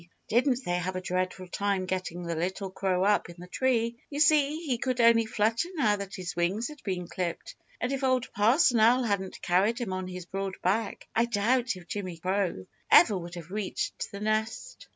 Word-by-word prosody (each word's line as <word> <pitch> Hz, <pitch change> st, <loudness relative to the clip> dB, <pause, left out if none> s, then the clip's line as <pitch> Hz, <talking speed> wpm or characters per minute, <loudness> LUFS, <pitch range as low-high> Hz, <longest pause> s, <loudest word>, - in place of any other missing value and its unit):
Didn't 250 Hz, +3 st, +2 dB
they 175 Hz, 0 st, 0 dB
have 185 Hz, +1 st, -3 dB
a 185 Hz, -, -2 dB
dreadful 185 Hz, 0 st, -2 dB
time 200 Hz, 0 st, -1 dB
getting 180 Hz, -2 st, -3 dB
the 170 Hz, 0 st, -3 dB
little 185 Hz, +4 st, -3 dB
crow 190 Hz, -1 st, 0 dB
up 205 Hz, -2 st, +2 dB
in 170 Hz, -, -10 dB
the 175 Hz, -, -9 dB
tree. 235 Hz, +2 st, 0 dB
You 290 Hz, -, -4 dB
see, 300 Hz, 0 st, +4 dB
he 250 Hz, -5 st, -1 dB
could 255 Hz, -1 st, -1 dB
only 230 Hz, -1 st, +5 dB
flutter 225 Hz, +8 st, +1 dB
now 220 Hz, -9 st, +3 dB
that 200 Hz, -1 st, -6 dB
his 180 Hz, -2 st, -5 dB
wings 185 Hz, -, 0 dB
had 300 Hz, -2 st, -12 dB
been 180 Hz, -3 st, -3 dB
clipped, 175 Hz, -1 st, -4 dB, 0.3 s
and 250 Hz, -, -1 dB
if 275 Hz, 0 st, -2 dB
Old 255 Hz, -1 st, +1 dB
Parson 240 Hz, +4 st, +4 dB
Owl 240 Hz, +4 st, +5 dB
hadn't 200 Hz, -4 st, -2 dB
carried 195 Hz, +6 st, +2 dB
him 230 Hz, -7 st, -3 dB
on 185 Hz, 0 st, -3 dB
his 180 Hz, -1 st, -7 dB
broad 195 Hz, +1 st, -4 dB
back, 200 Hz, +4 st, -1 dB
I 230 Hz, -, +4 dB
doubt 235 Hz, +2 st, +1 dB
if 180 Hz, -1 st, -12 dB
Jimmy 185 Hz, -4 st, -5 dB
Crow 185 Hz, -, -1 dB, 0.2 s
ever 210 Hz, -, +7 dB
would 175 Hz, -1 st, -6 dB
have 175 Hz, 0 st, -9 dB
reached 205 Hz, -2 st, -3 dB
the 200 Hz, -, -8 dB
nest. 220 Hz, -, -2 dB
200 Hz, 200 wpm, -28 LUFS, 185-235 Hz, 0.3 s, ever